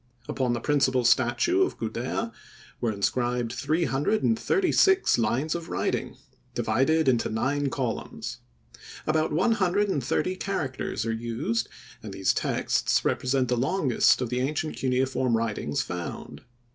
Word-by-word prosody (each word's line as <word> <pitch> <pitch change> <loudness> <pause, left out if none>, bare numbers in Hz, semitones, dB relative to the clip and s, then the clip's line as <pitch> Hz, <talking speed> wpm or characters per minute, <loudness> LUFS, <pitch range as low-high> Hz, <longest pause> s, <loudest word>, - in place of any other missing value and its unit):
Upon 125 -2 0
the 120 - -1
principal 130 -2 +2
statue 130 - +3
of 375 - +1
Gudea 120 - -3 0.5
were 115 - 0
inscribed 120 +3 -1
three 155 +7 0
hundred 145 +11 0
and 225 0 +2
thirty 385 -2 +1
six 380 - +4
lines 125 +8 0
of 170 -1 -5
writing, - - -2 0.4
divided 135 +8 +2
into 120 -3 +2
nine 140 +6 0
columns. 125 -4 -4 0.7
About 155 0 +1
one 185 +10 +2
hundred 205 -1 +2
and 145 -8 -1
thirty 185 +8 0
characters 140 - -3
are 115 - -1
used, 115 0 -2 0.3
and - - -8
these - - +1
texts - - 0
represent 130 0 +1
the 125 - +1
longest 135 -2 +2
of 125 - -2
the 125 - 0
ancient 150 +4 -2
cuneiform 130 -2 +1
writings 110 -10 -1
found. 85 -4 -6
130 Hz, 145 wpm, -26 LUFS, 120-160 Hz, 0.7 s, six